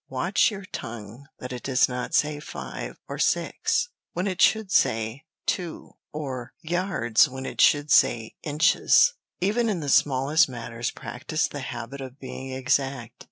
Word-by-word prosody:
Watch - - +2
your 200 -3 -7
tongue 115 - -8
that 125 0 -7
it 125 - -6
does 130 -2 +3
not 125 0 -3
say 150 0 +2
five 150 - -7
or - - -6
six 485 - +1 0.2
when 180 - -2
it 185 -2 -2
should 220 -3 +4
say 110 +7 +1 0.2
two, 180 -5 -3 0.2
or 130 -5 -5
yards 165 - +2
when 130 0 -7
it - - -2
should 145 0 +4
say 115 -2 +4
inches. 155 - +4 0.3
Even 220 +5 +1
in 195 -5 -1
the 145 -3 -3
smallest 135 +3 +4
matters, 120 -1 -4
practise 155 0 -3
the 145 - -7
habit 130 +1 -6
of 130 0 -8
being 130 0 -7
exact. 130 -2 -1
135 Hz, 155 wpm, -25 LUFS, 125-160 Hz, 0.3 s, should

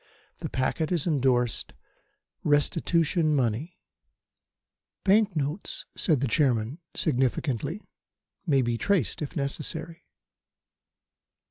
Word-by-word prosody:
The - - -4
packet 155 +5 -1
is 170 -5 +1
endorsed 130 - +1 0.7
'Restitution 155 +2 +2
money.'" 130 +6 -1 1.3
"Bank 205 -1 +4
notes, 150 +5 -2
gentlemen," - - -39
said 155 -7 +4
the 140 - +1
Chairman 125 +1 +1 0.2
significantly, 135 - -1 0.6
"may 135 -4 +4
be 120 -1 -1
traced 195 - +1
if 150 - -5
necessary." 160 +4 -4
150 Hz, 95 wpm, -27 LUFS, 130-165 Hz, 1.3 s, Bank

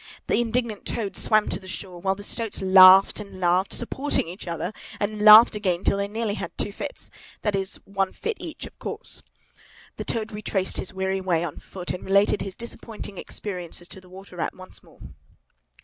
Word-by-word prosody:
The - - +2
indignant 235 -2 -2
Toad 210 -4 -3
swam 215 -1 +3
to 190 - -3
shore, 185 -2 -6
while 190 +1 +1
the 205 - -9
stoats 225 +1 -1
laughed 190 +1 +8
and 200 -2 -9
laughed, 180 +2 +2
supporting 265 - 0
each 180 +2 -9
other, 170 +4 -3 0.3
and 210 +1 -2
laughed 215 +3 +9
again, 190 -4 -1
till 200 - +2
they 200 0 -1
nearly 220 0 -2
had - - -6
two 205 - -1
fits—that 210 - -6
is, 195 -1 0
one 195 -1 -1
fit 455 -1 -4
each, - - -7
of - - -14
course. - - -3 0.8
The - - -4
Toad 225 -1 -2
retraced 205 -2 -2
his - - -2
weary 190 0 -2
way 175 -3 +1
on 165 -4 -5
foot, 180 -2 -7
and 180 - -5
related 200 +1 +3
his 195 -1 -5
disappointing 225 -4 -7
experiences 180 -3 -5
to 190 - -8
the 185 - -18
Water 185 0 -12
Rat - - -2
once 185 0 -8
more. - - -21
195 Hz, 185 wpm, -24 LUFS, 185-215 Hz, 0.8 s, laughed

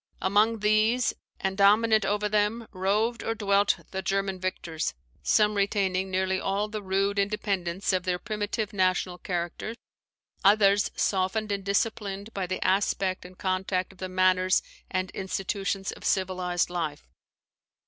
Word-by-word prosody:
Among 210 +3 +2
these, 215 +3 +3 0.3
and 190 0 -1
dominant 215 +2 +4
over 210 +1 +1
them, 210 +2 0
roved 210 +5 0
or 225 - -2
dwelt 200 -1 +2
the 190 - -3
German 195 -1 -1
victors: 170 - -3 0.3
some 210 0 +3
retaining 195 -2 0
nearly 190 0 0
all 200 +2 -1
the 215 0 -5
rude 195 +1 0
independence 195 -2 -1
of 185 - +2
their 180 0 -1
primitive 210 +1 -3
national 185 -2 +1
character; 175 +5 -3 0.7
others, 200 0 +5
softened 205 +2 0
and 200 -1 -2
disciplined 200 +1 -1
by 190 -2 -2
the 185 - -3
aspect 190 -1 +1
and 180 0 -12
contact 185 0 -1
of 190 - -20
the 185 - -4
manners 185 0 +3 0.3
and 185 -1 -2
institutions 195 +1 -2
of - - -11
civilized 180 -2 0
life. 160 - -3
195 Hz, 140 wpm, -27 LUFS, 185-210 Hz, 0.7 s, others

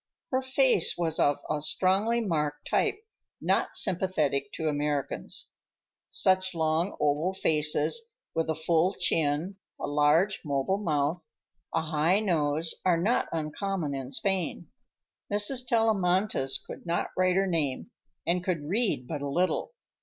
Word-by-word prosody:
Her 260 0 +1
face 260 -7 +3
was 165 -2 -1
of 145 -1 +2
a 150 -1 -1
strongly 195 +9 +1
marked 150 -7 -2
type - - +1 0.4
not - - 0
sympathetic 155 -7 +1
to 160 - -3
Americans. 145 -2 -2 0.6
Such 185 -1 +1
long, 160 +3 0
oval 150 +5 +1
faces, 155 - +1 0.2
with 165 -1 -1
a 160 - 0
full 165 +3 +2
chin, 160 +5 0 0.2
a - - -3
large, 150 +7 +2
mobile 145 +6 0
mouth, 155 -2 -1 0.5
a - - 0
high 160 +5 +2
nose, 160 -5 +1
are 180 -2 +3
not 220 +8 +1
uncommon 165 0 -3
in 135 -2 -5
Spain. 190 +6 -2 0.6
Mrs. 240 +5 +4
Tellamantez 195 - +2
could - - -10
not 170 +1 -1
write 185 -1 +2
her 195 +1 +3
name, 165 - -1 0.3
and 175 +1 +1
could 170 -6 -2
read 205 - 0
but 150 -3 -4
little. 175 - -1
170 Hz, 130 wpm, -28 LUFS, 150-195 Hz, 0.6 s, Mrs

